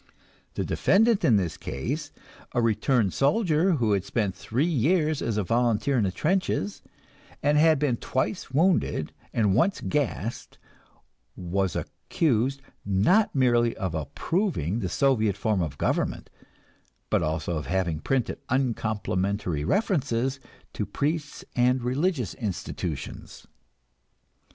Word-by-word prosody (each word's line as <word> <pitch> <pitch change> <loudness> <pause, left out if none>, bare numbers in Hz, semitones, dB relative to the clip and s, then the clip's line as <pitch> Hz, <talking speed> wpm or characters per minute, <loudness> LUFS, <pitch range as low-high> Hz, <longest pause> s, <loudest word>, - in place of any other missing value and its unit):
The - - -1
defendant 220 0 +3
in 125 -9 +5
this 90 -6 0
case, 145 - -4 0.4
a 120 - +1
returned 115 -2 +2
soldier 165 +3 +2
who 120 -8 +1
had 100 -2 +1
spent 100 -2 -1
three 115 - -1
years 155 0 +1
as 115 -2 -1
a 105 - +1
volunteer 115 +4 +1
in 115 -5 +2
the 95 - 0
trenches, 145 - -1 0.6
and 145 +1 +3
had 155 +1 +5
been 135 -4 +1
twice 130 - -2
wounded 160 - +1 0.2
and 105 -4 +2
once 170 - +2
gassed, 125 -5 -3 0.8
was 90 0 -1
accused, 135 -2 -1 0.2
not 105 - +3
merely 120 -3 +3
of 95 -5 -3
approving 100 - -1
the 95 -5 -2
Soviet 110 -7 +2
form 105 -2 0
of 75 -5 -3
government, - - -1 0.8
but - - +3
also 80 +1 -1
of 75 - -5
having 90 -3 0
printed 125 +5 -1
uncomplimentary 105 - -1
references 135 - 0 0.3
to - - -2
priests 150 0 -3
and 125 0 +2
religious 130 - 0
institutions. 105 -7 -5
120 Hz, 120 wpm, -26 LUFS, 100-150 Hz, 0.8 s, in